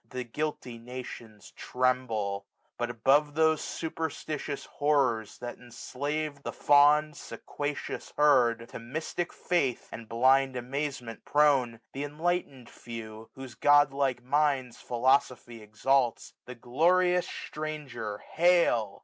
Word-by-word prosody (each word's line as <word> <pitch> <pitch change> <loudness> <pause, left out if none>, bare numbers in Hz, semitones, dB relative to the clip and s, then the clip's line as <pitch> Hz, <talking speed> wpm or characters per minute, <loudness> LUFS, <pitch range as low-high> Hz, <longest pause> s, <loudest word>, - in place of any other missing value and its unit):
The 125 -1 -4
guilty 125 -2 -4
nations 120 -3 -9
tremble. 125 -6 -1 0.3
But, 120 0 -2
above 135 +6 +3
171Q - - -20
Those 160 0 +3
superstitious 155 -3 -4
horrors 135 -7 0
that 120 0 -7
enflave 140 +5 -4
The - - -5
fond 150 +1 +4
sequacious 145 0 -6
herd, 120 -6 +4
to - - -8
mptic 155 +8 -4
feith 140 -11 -1
And 115 -1 -9
blind 130 +3 +3
amazement 125 -2 -4
prone; 135 -6 +2
the 140 - -4
enlightened 150 -3 -2
feWj^ 110 -2 -9
Whose 130 -2 -9
godlike 140 -3 +3
minds 135 -2 +1
philosophy 125 -1 0
exalts. 120 +4 0
The 125 - -9
glorious 175 +9 +2
stranger 140 -9 -6
hail. 170 - +2
135 Hz, 110 wpm, -29 LUFS, 120-150 Hz, 0.3 s, fond